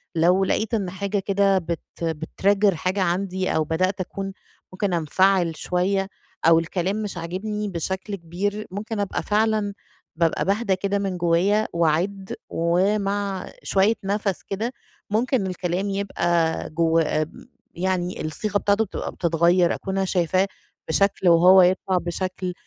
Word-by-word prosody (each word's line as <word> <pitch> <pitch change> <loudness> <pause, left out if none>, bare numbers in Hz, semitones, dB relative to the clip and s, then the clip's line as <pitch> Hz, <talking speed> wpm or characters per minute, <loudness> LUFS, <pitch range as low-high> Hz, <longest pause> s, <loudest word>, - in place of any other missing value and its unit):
لو 180 +4 +4
لقيت 220 +4 -1
إن 200 -5 0
حاجة 200 +2 -2
كده 195 0 +2
بت 170 -2 -3 0.2
بتtrigger 190 +5 +1
حاجة 185 +4 -1
عندي 185 +1 0
أو 160 - +2
بدأت 185 +5 0
أكون 195 +1 -5 0.4
ممكن 190 0 -1
أنفعل 175 +1 +2
شوية 195 +2 0 0.4
أو 165 0 +7
الكلام 185 +5 -2
مش 205 -3 -5
عاجبني 205 +5 -3
بشكل 190 +4 -3
كبير 195 +4 -3
ممكن 215 +2 -4
أبقى 200 - -2
فعلًا 215 -1 +1 0.4
بابقى 165 -1 +1
باهدا 200 0 +1
كده 200 +2 -1
من 195 -2 -2
جوايا 180 +5 +2
وأعِدّ 170 +4 0 0.2
ومع 195 +3 0
شوية 195 +3 +3
نَفَس 200 -1 -1
كده 220 +6 -3 0.4
ممكن 225 -1 +1
الكلام 180 +2 -2
يبقى 175 -4 0
جوّ 165 0 +2
م 155 -1 +1 0.5
يعني 180 0 -1
الصيغة 205 +6 -1
بتاعته 205 +2 +2
بتبقى - - -5
بتتغير، 170 +1 +2
أكون 195 0 -4
أنا 195 - +1
شايفاه 185 +1 +1 0.4
بشكل 195 +1 +2
وهو 180 +3 +7
يطلع 185 +1 +2
بشكل، 185 +1 -3
190 Hz, 135 wpm, -23 LUFS, 175-200 Hz, 0.5 s, أو